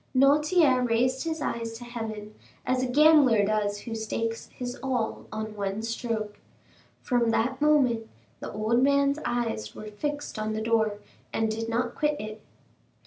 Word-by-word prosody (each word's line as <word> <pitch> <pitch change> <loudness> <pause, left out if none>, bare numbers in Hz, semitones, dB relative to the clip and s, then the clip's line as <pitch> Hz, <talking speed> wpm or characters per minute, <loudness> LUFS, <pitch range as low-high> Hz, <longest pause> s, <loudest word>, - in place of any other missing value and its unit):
Noirtier 290 0 +4
raised 250 +4 +1
his 320 -2 -2
eyes 230 -3 -3
to 230 +2 -9
heaven, 220 -3 -6 0.3
as 255 0 +1
a 255 - 0
gambler 275 -6 +5
does 205 -1 0
who 230 - -6
stakes 225 +1 -3
his 245 0 -6
all 250 -4 -2
on 215 0 -5
one 200 +1 -3
stroke. 225 -2 -3 0.6
From 240 -2 +2
that 250 +4 0
moment 260 -7 +3 0.3
the - - -6
old 215 +3 +1
man's 280 +1 +3
eyes 225 - -2
were - - -8
fixed 290 +2 -4
on 215 0 -2
the 215 - -2
door, 220 -2 +1 0.3
and 220 0 0
did 225 +1 -3
not 240 +1 -1
quit 300 -1 0
it. 215 0 -7
230 Hz, 155 wpm, -27 LUFS, 220-265 Hz, 0.6 s, gambler